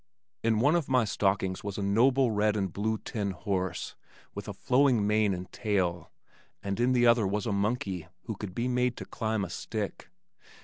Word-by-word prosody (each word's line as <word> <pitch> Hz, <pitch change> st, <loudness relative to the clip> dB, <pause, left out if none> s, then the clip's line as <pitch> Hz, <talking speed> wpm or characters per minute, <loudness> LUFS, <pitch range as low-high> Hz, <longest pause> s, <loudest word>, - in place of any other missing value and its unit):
In 115 Hz, -1 st, +2 dB
one 145 Hz, +7 st, +4 dB
of 165 Hz, -6 st, 0 dB
my 125 Hz, -3 st, +3 dB
stockings 95 Hz, -2 st, 0 dB
was 100 Hz, -1 st, -4 dB
a 100 Hz, -, -2 dB
noble 125 Hz, +5 st, +3 dB
red 105 Hz, 0 st, +2 dB
and 95 Hz, -3 st, -2 dB
blue 110 Hz, +2 st, -1 dB
tin 105 Hz, -2 st, -3 dB
horse 95 Hz, -2 st, -3 dB, 0.4 s
with -, -, -7 dB
a -, -, -4 dB
flowing 125 Hz, -4 st, +3 dB
mane 105 Hz, 0 st, +3 dB
and 90 Hz, 0 st, -5 dB
tail, 95 Hz, -6 st, -1 dB, 0.5 s
and 100 Hz, +1 st, -3 dB
in 125 Hz, +2 st, +3 dB
the 120 Hz, -1 st, +4 dB
other 115 Hz, -3 st, +5 dB
was 100 Hz, +1 st, -1 dB
a 115 Hz, -, -1 dB
monkey 100 Hz, -4 st, -1 dB, 0.2 s
who -, -, -4 dB
could 95 Hz, -3 st, -7 dB
be 120 Hz, +1 st, 0 dB
made 125 Hz, 0 st, +1 dB
to -, -, -6 dB
climb 110 Hz, -3 st, -2 dB
a -, -, -8 dB
stick. 105 Hz, +2 st, -5 dB
105 Hz, 190 wpm, -29 LUFS, 100-120 Hz, 0.5 s, other